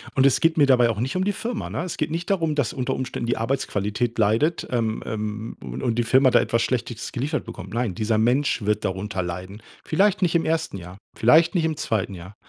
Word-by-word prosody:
Und 135 Hz, -, +4 dB
es 140 Hz, -, +3 dB
geht 165 Hz, 0 st, +3 dB
mir 145 Hz, -, +6 dB
dabei 125 Hz, -3 st, +4 dB
auch 110 Hz, -2 st, -2 dB
nicht 130 Hz, +7 st, -2 dB
um 185 Hz, -, +1 dB
die 205 Hz, -, +1 dB
Firma, 230 Hz, +3 st, -4 dB
ne? 165 Hz, -, -3 dB
Es 180 Hz, -, -4 dB
geht 150 Hz, 0 st, -1 dB
nicht 170 Hz, +3 st, -3 dB
darum, 165 Hz, -6 st, +1 dB
dass 140 Hz, -6 st, 0 dB
unter 130 Hz, -2 st, -2 dB
Umständen 130 Hz, -2 st, -4 dB
die 120 Hz, -, 0 dB
Arbeitsqualität 115 Hz, -1 st, -1 dB
leidet, 115 Hz, +11 st, +2 dB
ähm 115 Hz, -3 st, -1 dB
ähm 110 Hz, 0 st, -4 dB
u -, -, -7 dB
und 115 Hz, -, 0 dB
die 120 Hz, -, +1 dB
Firma 130 Hz, +2 st, +4 dB
da -, -, +6 dB
etwas 115 Hz, 0 st, 0 dB
Schlechtes 120 Hz, -2 st, -3 dB
geliefert 145 Hz, +5 st, -2 dB
bekommt. 95 Hz, +3 st, -9 dB
Nein, 115 Hz, -6 st, -1 dB
dieser 110 Hz, 0 st, 0 dB
Mensch 125 Hz, +3 st, +2 dB
wird 105 Hz, 0 st, 0 dB
darunter 95 Hz, 0 st, -2 dB
leiden. 95 Hz, +5 st, -7 dB, 0.2 s
Vielleicht 195 Hz, +4 st, +2 dB
nicht 175 Hz, -1 st, +2 dB
im 165 Hz, -, +3 dB
1. 160 Hz, -6 st, -1 dB
Jahr, 90 Hz, +1 st, -10 dB, 0.2 s
vielleicht 160 Hz, -, +5 dB
nicht 165 Hz, -, +2 dB
im 155 Hz, -2 st, -1 dB
2. 105 Hz, -4 st, -1 dB
Jahr. 90 Hz, +3 st, -10 dB
120 Hz, 230 wpm, -23 LUFS, 105-155 Hz, 0.2 s, mir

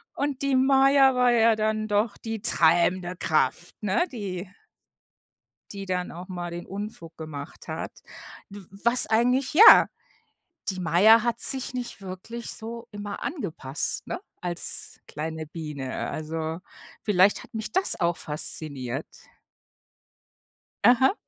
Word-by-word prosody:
Und 285 Hz, -2 st, -2 dB
die 275 Hz, -1 st, +1 dB
Maja 270 Hz, 0 st, +5 dB
war 250 Hz, -1 st, +4 dB
ja 230 Hz, -1 st, +4 dB
dann 215 Hz, 0 st, -1 dB
doch 205 Hz, +1 st, 0 dB
die 225 Hz, -2 st, -6 dB
treibende 175 Hz, -2 st, +2 dB
Kraft, 155 Hz, +3 st, -1 dB
ne, 210 Hz, -, +1 dB
die 195 Hz, -6 st, -5 dB, 1.2 s
die 200 Hz, -1 st, -7 dB
dann 180 Hz, -1 st, -2 dB
auch 175 Hz, +2 st, -9 dB
mal 175 Hz, -2 st, -5 dB
den 175 Hz, 0 st, -7 dB
Unfug 195 Hz, -5 st, -8 dB
gemacht 155 Hz, -2 st, -9 dB
hat. -, -, -6 dB, 0.5 s
W 205 Hz, 0 st, -10 dB, 0.2 s
was 235 Hz, +2 st, +5 dB
eigentlich 250 Hz, +5 st, +2 dB
ja, 425 Hz, +8 st, +9 dB, 0.8 s
die 190 Hz, -1 st, -4 dB
Maya 210 Hz, +7 st, +5 dB
hat 235 Hz, -1 st, -1 dB
sich 260 Hz, -1 st, +1 dB
nicht 245 Hz, -4 st, -6 dB
wirklich 195 Hz, +5 st, -7 dB
so 230 Hz, +1 st, -7 dB
immer 205 Hz, -1 st, -6 dB
angepasst, 170 Hz, -, -3 dB
ne, 355 Hz, -, -4 dB, 0.2 s
als 175 Hz, -1 st, -3 dB
kleine 160 Hz, +1 st, -5 dB
Biene, 150 Hz, -4 st, -5 dB
also, 160 Hz, +1 st, -4 dB, 0.4 s
vielleicht 200 Hz, -1 st, +3 dB
hat -, -, -18 dB
mich 220 Hz, -1 st, -5 dB
das 380 Hz, -, +1 dB
auch 170 Hz, 0 st, +1 dB
fasziniert. 145 Hz, -3 st, -2 dB, 1.8 s
Aha. 250 Hz, +6 st, +5 dB
200 Hz, 125 wpm, -25 LUFS, 170-235 Hz, 1.8 s, ja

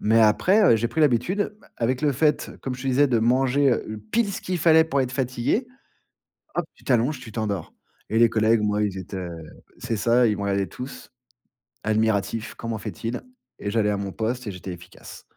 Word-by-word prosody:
Mais 110 Hz, +2 st, +4 dB
après, 120 Hz, -, +5 dB
j'ai 115 Hz, +2 st, 0 dB
pris 160 Hz, -, -2 dB
l'habitude, 155 Hz, -, +2 dB
bah, -, -, -21 dB
avec 125 Hz, +4 st, -1 dB
le 150 Hz, -2 st, +3 dB
fait, 150 Hz, +3 st, +1 dB
comme 130 Hz, -, -3 dB
je 125 Hz, -, -9 dB
te -, -, -4 dB
disais, 135 Hz, +2 st, +3 dB
de 120 Hz, -3 st, +2 dB
manger 130 Hz, +2 st, +3 dB, 0.4 s
pile, 225 Hz, -3 st, +2 dB
ce -, -, -5 dB
qu'il 185 Hz, -, -2 dB
fallait 160 Hz, 0 st, +6 dB
pour 140 Hz, -4 st, 0 dB
être 130 Hz, -2 st, -1 dB
fatigué. 130 Hz, -, 0 dB, 0.9 s
Hop, 175 Hz, -2 st, -1 dB
tu -, -, -22 dB
t'allonges, 125 Hz, +3 st, +2 dB
tu 115 Hz, -3 st, -10 dB
t'endors 105 Hz, -6 st, -3 dB, 0.4 s
et 110 Hz, -, +2 dB
les 115 Hz, 0 st, +6 dB
collègues, 110 Hz, 0 st, +3 dB
moi, 105 Hz, 0 st, +1 dB
ils 100 Hz, -2 st, -1 dB
étaient 95 Hz, 0 st, -6 dB, 0.5 s
c'est 120 Hz, -1 st, -3 dB
ça, 120 Hz, +3 st, +3 dB
ils 105 Hz, -2 st, +1 dB
me -, -, -4 dB
regardaient 100 Hz, -1 st, 0 dB
tous, 125 Hz, +6 st, -9 dB, 0.7 s
admiratifs 110 Hz, 0 st, 0 dB
«Comment 115 Hz, -1 st, -4 dB
fait-il?» 115 Hz, +3 st, -5 dB, 0.4 s
Et 100 Hz, -, -3 dB
j'allais 105 Hz, -1 st, +2 dB
à 105 Hz, -, 0 dB
mon 100 Hz, -1 st, -4 dB
poste 120 Hz, +5 st, -3 dB
et 105 Hz, -, -3 dB
j'étais 90 Hz, 0 st, -7 dB
efficace. 85 Hz, 0 st, -11 dB
115 Hz, 195 wpm, -24 LUFS, 105-135 Hz, 0.9 s, fallait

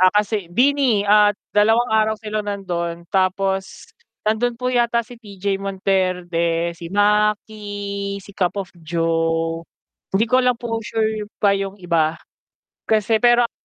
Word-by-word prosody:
Ah, 185 Hz, -, +7 dB
kasi 210 Hz, -3 st, 0 dB
BINI 250 Hz, +1 st, +2 dB
at 210 Hz, 0 st, +5 dB, 0.2 s
dalawang 225 Hz, +3 st, +3 dB
araw 220 Hz, 0 st, +3 dB
sila 215 Hz, 0 st, -3 dB
nandon 175 Hz, -4 st, -4 dB
tapos 190 Hz, 0 st, -1 dB, 0.3 s
nandun 225 Hz, +3 st, 0 dB
po 250 Hz, +1 st, -2 dB
yata 235 Hz, -1 st, +2 dB
si 245 Hz, 0 st, -13 dB
TJ 200 Hz, -2 st, -3 dB
Monterde, 180 Hz, -3 st, 0 dB
si 170 Hz, 0 st, -9 dB
Maki, 205 Hz, 0 st, 0 dB
si 200 Hz, -, -13 dB
Cup 180 Hz, -2 st, 0 dB
of 195 Hz, -2 st, -4 dB
Joe, 165 Hz, 0 st, 0 dB, 0.5 s
hindi 205 Hz, +3 st, +4 dB
ko 255 Hz, -, +5 dB
lang 250 Hz, -1 st, +2 dB
po 230 Hz, -1 st, -3 dB
sure 220 Hz, -1 st, -2 dB
pa 200 Hz, -1 st, +3 dB
yung 195 Hz, 0 st, -2 dB
iba 165 Hz, -4 st, 0 dB, 0.7 s
kasi 220 Hz, 0 st, +2 dB
pero 240 Hz, 0 st, +5 dB
ang 235 Hz, -, -2 dB
205 Hz, 140 wpm, -21 LUFS, 185-220 Hz, 0.7 s, Ah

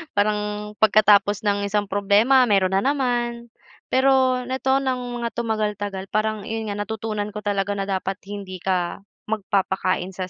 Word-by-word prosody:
parang 210 Hz, +1 st, +2 dB, 0.4 s
pagkatapos 205 Hz, -1 st, +4 dB
ng 200 Hz, -1 st, 0 dB
isang 205 Hz, 0 st, -1 dB
problema 210 Hz, +6 st, +4 dB
meron 195 Hz, -3 st, +2 dB
na -, -, +2 dB
naman. 240 Hz, -4 st, -1 dB, 0.4 s
Pero 260 Hz, -1 st, +3 dB
nito, 265 Hz, +1 st, +1 dB
ng 260 Hz, -2 st, -1 dB, 0.2 s
mga 235 Hz, -1 st, -2 dB
tumagal-tagal 210 Hz, -4 st, -2 dB
parang, 215 Hz, -1 st, -1 dB
'yon 220 Hz, -1 st, -4 dB
nga, 205 Hz, -, -4 dB
natutunan 210 Hz, 0 st, -4 dB
ko 210 Hz, -, -5 dB
talaga 205 Hz, -1 st, -1 dB
na 200 Hz, 0 st, -4 dB
dapat 190 Hz, 0 st, -2 dB
hindi 195 Hz, -3 st, -7 dB
ka 180 Hz, -1 st, -1 dB, 0.2 s
magpapakain 190 Hz, -3 st, -1 dB
sa 185 Hz, 0 st, -5 dB
210 Hz, 145 wpm, -23 LUFS, 195-235 Hz, 0.4 s, pagkatapos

